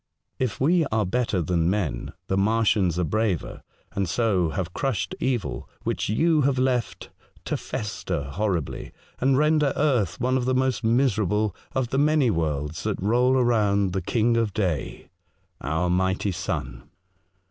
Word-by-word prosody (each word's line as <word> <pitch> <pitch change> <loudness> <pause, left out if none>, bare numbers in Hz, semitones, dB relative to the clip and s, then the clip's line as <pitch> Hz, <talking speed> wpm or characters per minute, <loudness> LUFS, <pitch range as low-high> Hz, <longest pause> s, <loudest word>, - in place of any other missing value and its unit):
If 125 -5 -1
we 165 +5 +3
are 110 -2 0
better 105 -3 0
than 85 +1 +1
men, 85 -9 -2
the 95 - -1
Martians 100 -3 +2
are 90 - +1
braver, 105 0 -1 0.3
and 95 -3 -2
so 95 -4 +1
have 90 0 -4
crushed 110 -9 -2
evil 125 -6 -2
which - - -2
you 155 +8 +3
have 135 -1 +2
left 125 -2 -1 0.3
to - - -1
fester 95 -7 -4
horribly, 85 +1 -3 0.3
and 130 +1 +3
render 150 -1 +3
earth 125 - +1
one 130 +1 +1
of 125 - -1
the 130 0 +1
most 130 -3 0
miserable 110 -5 +1 0.2
of 130 -3 -1
the 135 - 0
many 150 -4 +3
worlds 80 -1 -2
that 105 0 -2
roll 125 +6 +3
around 105 -6 +2
the 95 - -1
King 115 +5 +1
of 110 -4 0
Day 90 -9 -2 0.2
— - - -40
our 80 +5 -1
mighty 95 +2 +1
sun. 85 -8 -4
105 Hz, 155 wpm, -25 LUFS, 90-125 Hz, 0.3 s, we